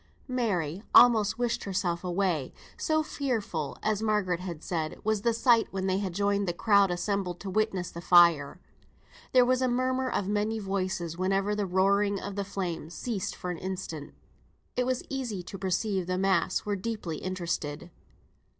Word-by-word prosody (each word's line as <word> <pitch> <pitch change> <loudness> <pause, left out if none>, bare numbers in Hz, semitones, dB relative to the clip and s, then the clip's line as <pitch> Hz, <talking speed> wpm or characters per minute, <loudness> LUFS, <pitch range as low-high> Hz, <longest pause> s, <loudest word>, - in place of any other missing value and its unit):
Mary 200 - -1
almost 220 -3 +6
wished 240 -1 -1
herself 185 -3 -1
away, 175 -6 0 0.2
so 315 0 +1
fearful 225 - -3
(as 215 -1 0
Margaret 210 -5 +1
had 175 -4 -6
said) 160 -3 -3
was 220 -1 +1
the 235 - +2
sight 230 0 +4
when 190 -1 -3
they 190 0 +1
joined 200 +2 0
the 175 - 0
crowd 200 +2 +4
assembled 180 0 -2
to 195 - -5
witness 195 -4 0
the 170 - -7
fire. 170 -5 +5 0.7
There 250 -1 +6
was 255 +1 +2
a 255 - +3
murmur 255 +1 0
of 195 - -1
many 210 +2 0
voices 185 -4 -3
whenever 195 +2 +1
the 205 -2 -1
roaring 200 +2 +2
of 200 +1 -6
the 200 - -1
flames 175 -4 -4
ceased 220 -7 -3
for 180 - -4
an 175 - -5
instant. 180 -5 -6 0.6
It 250 0 0
was 255 -1 -1
easy 240 -9 -4
to 195 +2 -8
perceive 190 0 -1
the 185 0 -1
mass 190 -2 +1
were 205 -1 0
deeply 195 -6 -4
interested. 170 -3 -4
195 Hz, 165 wpm, -28 LUFS, 180-215 Hz, 0.7 s, almost